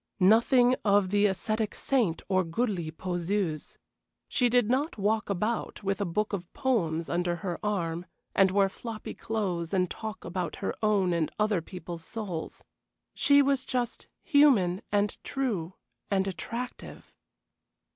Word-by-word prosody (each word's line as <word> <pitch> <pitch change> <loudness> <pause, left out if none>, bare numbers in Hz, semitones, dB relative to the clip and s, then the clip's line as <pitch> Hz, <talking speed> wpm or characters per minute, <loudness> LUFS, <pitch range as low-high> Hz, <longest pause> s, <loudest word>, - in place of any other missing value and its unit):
Nothing 240 +6 +5
of 200 -2 +3
the 205 0 +4
ascetic 215 +3 -1
saint 235 -12 0
or 185 -1 +2
goody 175 -1 -1
poseuse. 175 0 -2 0.5
She 245 -3 +2
did 245 -2 +3
not 270 +5 0
walk 215 +2 0
about 210 +4 -2
with 195 +1 -1
a - - +1
book 210 +5 -1
of 180 -3 -4
poems 170 - 0
under 175 0 0
her 175 -2 -2
arm, 175 -5 -2 0.3
and 195 -1 +5
wear 195 +1 +3
floppy 220 +2 -7
clothes 195 -6 -2
and 180 -2 +1
talk 220 -2 -6
about 175 -1 -3
her - - -3
own 200 -4 +2
and 165 -2 +1
other 210 -4 +2
people's 175 -1 -8
souls. 190 -6 -6 0.5
She 285 0 +5
was 275 -1 +1
just 245 -2 -2 0.2
human 245 - +4
and 205 0 0
true 200 - -2 0.3
and 195 -1 +1
attractive. 235 +6 -6
200 Hz, 140 wpm, -28 LUFS, 175-225 Hz, 0.5 s, Nothing